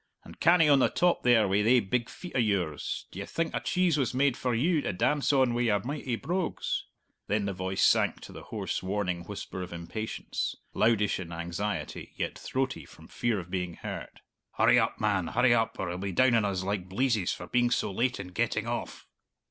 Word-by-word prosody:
"And - - -13
canny 170 -2 +5
on 140 -2 +6
the - - +4
top 175 -1 +2
there 120 -4 +4
wi' 100 +2 +2
thae 120 +4 +5
big 120 +3 -1
feet 180 - -9
o' - - +1
yours; 95 - -1
d'ye 100 - -5
think 165 +9 -2
a - - 0
cheese 180 -4 +1
was 125 -2 0
made 135 -1 +3
for 125 -2 -1
you 155 +6 +2
to - - -2
dance 145 +11 +1
on 130 -4 +3
wi' 120 - 0
your 110 -4 +2
mighty 135 -2 -3
brogues?" 180 +8 -2 0.4
Then 105 0 0
the 100 - -2
voice 95 +1 -1
sank - - +3
to - - -10
the - - -9
hoarse, - - -3
warning 95 -3 -2
whisper 95 -1 -6
of 90 - -6
impatience 85 +6 -4 0.2
loudish 110 -4 +2
in 85 -2 -7
anxiety, 85 +5 -4
yet - - -2
throaty 135 0 -2
from - - -16
fear 120 -3 0
of 90 -1 -9
being 90 -2 -2
heard. - - -7 0.3
"Hurry - - +5
up, - - 0
man 100 -5 +1
hurry 125 +4 +3
up, 115 -1 +1
or 95 - -2
he'll 90 +1 -4
be 100 0 -3
down 130 +6 +4
on 115 -3 +3
us 95 -2 -1
like 95 -2 -3
bleezes 110 -2 +1
for - - -5
being 120 0 +2
so 115 -4 0
late 120 +5 0
in 95 -2 -6
getting 90 - -1
off!" - - -4
110 Hz, 210 wpm, -29 LUFS, 95-130 Hz, 0.4 s, on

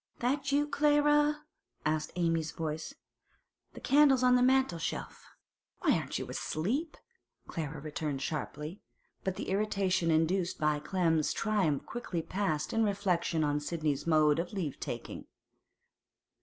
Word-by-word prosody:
'That 280 +3 0
you, 290 +1 +3
Clara?' 295 0 +3 0.4
asked 155 0 0
Amy's 165 -3 0
voice. 160 -1 -4 0.8
'The - - -10
candle's 275 -3 +5
on 250 0 +5
the 250 - +4
mantel 260 -8 +3
shelf.' - - -5 0.5
'Why - - +4
aren't - - -2
you - - -5
asleep?' 255 - -2 0.5
Clara 155 -2 -5
returned 150 -1 -3
sharply. 155 +4 -4 0.4
But 190 -1 -1
the - - -5
irritation 195 -3 +1
induced 175 +3 +1
by 150 -1 +1
Clem's 165 -2 +1
triumph 195 -10 0
quickly 185 -9 -4
passed 160 -6 -2
in 225 - +3
reflection 185 -6 0
on 145 0 +1
Sidney's 150 -1 -2
mode 155 -1 +4
of 175 +4 -3
leave 170 -9 -3
taking. - - -6
175 Hz, 130 wpm, -31 LUFS, 155-240 Hz, 0.8 s, candle's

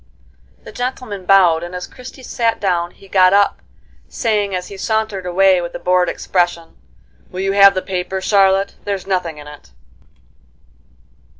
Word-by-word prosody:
The - - -11
gentleman 245 -6 -5
bowed, 180 -5 +5
and 175 +1 -7
as 180 - -5
Christie 255 +1 -13
sat 230 -2 -1
down 175 -3 0
he 195 - -19
got 185 -1 +4
up, 200 0 +2 0.5
saying, 205 -4 -1
as 180 0 -5
he 200 - -9
sauntered 215 -2 -2
away 185 0 +3
with 170 - -6
a - - -5
bored 180 -1 +1
expression: 175 -2 -2 0.5
"Will 185 - -6
you 195 0 0
have 200 0 +6
the 185 - -2
paper, 190 0 -3
Charlotte? 195 0 +2
There's 200 -2 -4
nothing 180 -5 -2
in 150 - -11
it." 150 - -13
190 Hz, 160 wpm, -18 LUFS, 180-200 Hz, 0.5 s, have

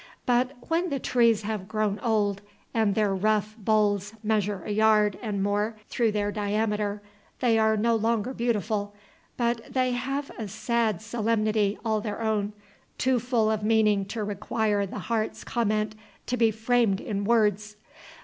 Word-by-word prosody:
But 250 +2 +2
when 335 +2 +1
the 280 - -1
trees 235 -4 +2
have 205 -3 -4
grown 215 -1 -1
old, 205 -4 0 0.3
and 220 -4 +2
their 210 -3 +2
rough 215 +2 +1
boles 210 -1 +1
measure 210 -3 0
a - - -3
yard 210 -1 +3
and 205 -4 -2
more 205 +2 0
through 230 -3 +1
their 205 -1 0
diameter, 210 0 -1 0.4
they 230 -3 +3
are 220 0 +3
no 230 +2 +2
longer 225 +2 0
beautiful, 215 -4 -1 0.4
but 235 -1 0
they 255 -1 +1
have 270 +3 -3
a 220 - -3
sad 220 -1 -1
solemnity 215 -2 0
all 220 -1 +1
their 210 -1 -4
own, 215 -2 -1 0.4
too 260 -1 +2
full 230 -2 +1
of 215 -1 -1
meaning 210 -2 +3
to 215 +2 -4
require 205 0 -1
the - - -7
heart's 225 -2 -2
comment 215 -2 0 0.3
to 250 - -1
be 230 -2 +4
framed 220 -2 +1
in 205 -2 -3
words. 210 -1 +1
215 Hz, 155 wpm, -26 LUFS, 205-230 Hz, 0.4 s, be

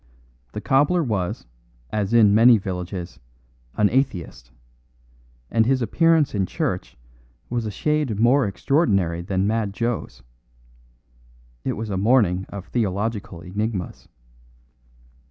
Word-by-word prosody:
The 105 - -5
cobbler 145 - +2
was, 100 -9 -2 0.5
as 105 -1 -1
in 110 -4 +5
many 115 +2 +7
villages, 90 -2 -6 0.6
an 105 - +3
atheist, 105 - -2 1.0
and 115 - +3
his 135 0 +2
appearance 165 +3 +2
in 95 -3 0
church - - -3 0.5
was 120 -2 -1
a - - -2
shade 145 -1 -1
more 125 +2 +4
extraordinary 100 - +1
than 95 +2 -1
Mad 105 -1 -1
Joe's. 115 - -3 1.4
It - - -1
was 110 -1 -5
a 95 - -1
morning 100 -4 +2
of 100 -2 -7
theological 105 -4 -2
enigmas. 100 0 -4
105 Hz, 115 wpm, -23 LUFS, 95-120 Hz, 1.4 s, many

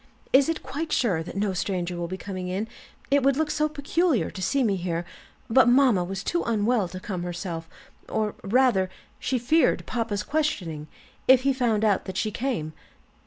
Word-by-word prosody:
"Is 270 +3 +6
it 330 - -2
quite 310 +3 -4
sure 190 -10 +2
that 170 - -7
no 200 -1 0
stranger 180 -1 -2
will 175 0 -3
be 185 +2 -5
coming 185 -2 -5
in? 190 +4 -2 0.4
It 285 0 +5
would 275 0 +3
look 315 -1 0
so 305 0 +1
peculiar 295 - 0
to 190 - -7
see 270 +9 +1
me 205 -4 +2
here; 175 -2 -2 0.4
but 255 +2 +5
mamma 245 -7 +5
was 190 +2 -5
too 345 - 0
unwell 220 -2 +1
to 185 +1 -7
come 185 -1 -4
herself 175 -2 -5 0.4
or 215 -1 -1
rather, 210 -3 +3 0.3
she 260 - 0
feared 285 +7 +2
papa's 225 -4 -2
questioning, 200 - -2 0.4
if 260 -1 +7
he 275 0 +3
found 230 -4 +1
out 205 -3 +2
that 190 0 -5
she 215 - 0
came." 225 - -2
215 Hz, 185 wpm, -26 LUFS, 185-265 Hz, 0.4 s, if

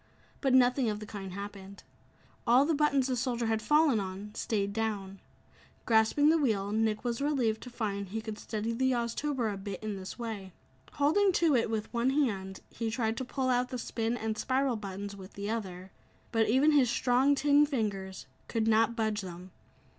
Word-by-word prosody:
But 270 -3 +3
nothing 250 -1 +4
of 210 -1 -3
the 215 - -7
kind 195 -3 -7
happened. 200 0 -8 0.6
All 250 +4 +6
the 325 - +1
buttons 285 -3 +2
the 255 -1 0
soldier 240 -1 -1
had 220 -1 0
fallen 295 0 +4
on 195 +2 -6
stayed 200 -3 -1
down. 200 -3 -3 0.7
Grasping 225 +6 +4
the 325 +1 +4
wheel, 205 -8 0
Nick 220 0 0
was 240 +1 -2
relieved 255 -7 0
to 250 - -8
find 200 -5 -3
he 220 +3 -3
could 220 -1 -6
steady 220 +1 -3
the 260 +2 +1
Oztober 235 0 -1
a - - -6
bit 195 0 -7
in 210 -2 -3
this 185 0 -7
way. 215 -6 -6 0.4
Holding 330 +8 +3
to 330 -5 +3
it 230 -2 +1
with 220 0 -3
one 235 +2 +2
hand, 200 -10 -1
he 230 -1 -3
tried 225 -1 -1
to 260 - -2
pull 260 +1 -2
out 250 0 +1
the 255 - -4
"spin" 230 0 -2
and 220 -1 -2
"spiral" 260 -1 +1
buttons 200 -1 -6
with 190 -1 -11
the 200 +1 -4
other. 190 -4 -5 0.4
But 225 -1 +2
even 270 +6 +4
his 275 -5 +4
strong 260 +4 +3
tin 290 +1 +4
fingers 200 -8 -3 0.2
could 225 -2 -1
not 225 +1 +3
budge 220 -2 0
them. 180 0 -9
225 Hz, 190 wpm, -30 LUFS, 205-260 Hz, 0.7 s, All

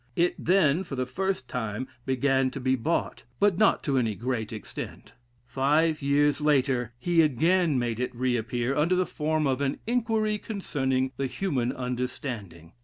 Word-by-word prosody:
It 175 +1 +2
then, 175 -2 +3
for 150 - -6
the 130 -1 -1
first 185 +1 -2
time, 110 0 -3 0.2
began 130 0 +2
to 135 - -6
be 130 0 +2
bought; 155 +7 -1 0.2
but 200 -3 +3
not 215 - +4
to 135 -3 +1
any 110 -4 0
great 115 -1 -3
extent. 110 -2 -8 0.3
Five 150 +6 +1
years 145 +1 +2
later, 135 -5 +2
he 170 +5 +3
again 160 +2 +2
made 120 -2 -1
it 125 0 -2
re 125 0 +1
appear, 120 +3 -1
under 165 +5 +2
the 185 0 +2
form 155 -1 -1
of 135 0 0
an 140 0 0
"Inquiry 225 -3 0
Concerning 135 - -1
the 135 - -1
Human 130 -6 -1
Understanding." 120 - -5
135 Hz, 165 wpm, -27 LUFS, 125-165 Hz, 0.3 s, not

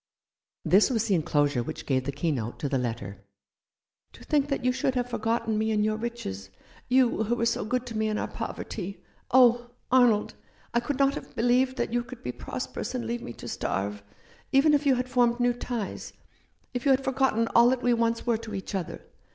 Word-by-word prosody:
This 195 +4 +5
was 230 -4 0
the 210 - +1
enclosure 145 -6 +2
which - - -6
gave 130 -2 0
the 140 - -1
key 160 +4 -1
note 120 -4 -3
to 145 - -3
the 135 -1 0
letter. 100 -5 -4 0.9
"To - - -14
think 290 -2 +1
that 275 -3 -2
you 255 - +4
should 260 +1 -1
have 245 -1 0
forgotten 225 -2 -1
me 220 0 0
in 210 -1 +2
your 215 0 +1
riches 215 - -5 0.2
— - - -26
you, 250 -3 +3
who 235 +3 +1
were 230 - 0
so 235 - 0
good 250 +3 -1
to 235 -2 -7
me 220 0 +1
in 210 - -1
our - - -2
poverty! 195 +3 -6 0.3
Oh, 245 -1 +5 0.2
Arnold, 245 -5 +4 0.4
I 235 - +3
could 255 +3 -3
not 275 0 +3
have - - -8
believed 250 +3 +2
that - - -2
you 240 0 +1
could 255 0 -11
be 125 - -2
prosperous 250 - -5
and 245 - -3
leave 235 0 -3
me 120 - -7
to - - -10
starve, 100 +1 -2 0.5
even 290 +2 +5
if 290 0 +2
you 270 - +5
had 250 0 -2
formed 240 -1 +2
new 245 0 +3
ties; 240 -3 -5 0.6
if 245 -1 -3
you 280 - +2
had 265 0 +4
forgotten 265 -4 +1
all 235 +1 +6
that 255 -1 0
we 245 - +4
once 230 0 0
were 235 -2 +2
to 215 -2 -7
each 190 - -6
other. 185 -4 -4
235 Hz, 215 wpm, -27 LUFS, 195-250 Hz, 0.9 s, all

